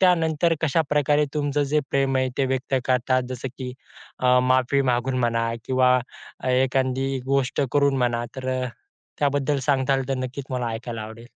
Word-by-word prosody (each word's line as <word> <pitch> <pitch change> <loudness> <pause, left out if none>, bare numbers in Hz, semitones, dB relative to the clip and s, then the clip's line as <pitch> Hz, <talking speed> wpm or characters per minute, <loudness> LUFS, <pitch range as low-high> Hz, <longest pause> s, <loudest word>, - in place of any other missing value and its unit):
त्यानंतर 165 -2 +3
कशाप्रकारे 150 -1 +2
तुमचं 145 -1 0
जे 150 - +5
प्रेम 135 -1 +1
आहे 130 0 +1
ते 135 - +3
व्यक्त 130 +1 -2
करतात? 130 0 +2
जसं 130 +1 -4
की 125 -2 -5 0.5
अ, 125 0 +4
माफी 130 +2 +2
मागून 130 +1 -1
म्हणा 115 -1 +1 0.2
किंवा 130 -1 +3 0.4
अ, 130 - -3
एखादी 130 +1 +1
गोष्ट 135 +1 +1
करून 140 -1 +3
म्हणा, 120 -1 0
तर 130 0 -4 0.2
अ, - - -1 0.5
त्याबद्दल 145 0 +1
सांगाल 135 -1 +1
तर 135 - +1
नक्कीच 130 +2 -6
मला 125 -2 -1
ऐकायला 115 -1 -5
आवडेल? 110 +2 -10
130 Hz, 160 wpm, -24 LUFS, 125-140 Hz, 0.5 s, जे